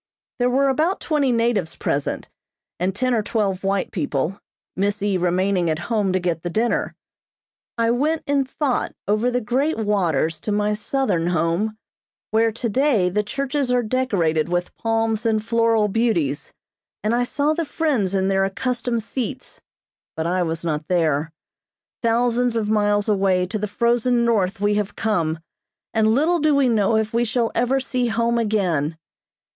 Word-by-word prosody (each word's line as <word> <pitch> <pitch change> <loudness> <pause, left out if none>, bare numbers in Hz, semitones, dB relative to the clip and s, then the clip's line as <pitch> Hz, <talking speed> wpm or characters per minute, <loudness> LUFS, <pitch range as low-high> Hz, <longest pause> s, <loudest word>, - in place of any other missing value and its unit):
There 245 0 +3
were 275 +2 +2
about 315 +8 +1
twenty 290 -5 +1
natives 230 -7 0
present, 140 0 -2 0.5
and 185 +2 -1
ten 255 +3 0
or 225 - +2
twelve 200 -3 -1
white 195 -1 0
people, 160 +1 -2 0.3
Miss 200 +1 -1
E. 205 -2 +1
remaining 180 0 +1
at 155 - 0 0.2
home 205 -4 +1
to 185 - +1
get 175 -3 -2
the 175 - -3
dinner. 225 +6 0 0.8
I 230 0 +2
went 300 +6 0
in 280 -1 +2
thought 265 0 -2
over 215 +4 +2
the 250 0 0
great 265 +8 0
waters 175 -8 0
to 215 - -4
my 210 0 +1
southern 210 -6 -1
home, 175 +6 0 0.5
where 225 +1 +3
today 235 -3 +1
the 210 +4 +1
churches 275 +4 -2
are 250 -1 +2
decorated 195 -10 0
with 175 0 -2
palms 225 -1 0
and 220 -2 0
floral 230 -2 +2
beauties, 190 - 0 0.5
and 215 +2 +1
I 245 +1 +2
saw 285 +5 0
the 335 +1 -1
friends 280 - 0
in 190 0 +1
their 195 0 +2
accustomed 235 +3 -1
seats 260 +3 -5 0.5
but 160 - -2
I 180 +2 +1
was 165 -1 -2
not 155 -2 -2
there. 160 -3 +1 0.7
Thousands 240 +1 +1
of 215 -2 0
miles 205 -1 +2
away 190 -3 +2
to 210 +4 -4
the 210 - -2
frozen 235 +3 +1
north 200 -5 +1
we 205 +1 +2
have 205 -1 -2
come, 170 -8 0 0.6
and 220 -1 +3
little 310 +10 +3
do 305 -1 +3
we 275 -2 +3
know 220 -1 +2
if 220 0 -1
we 235 +1 +2
shall 235 0 0
ever 250 +3 +1
see 255 -2 -1
home 235 +1 +1
again. 175 -9 0
215 Hz, 165 wpm, -22 LUFS, 185-245 Hz, 0.8 s, There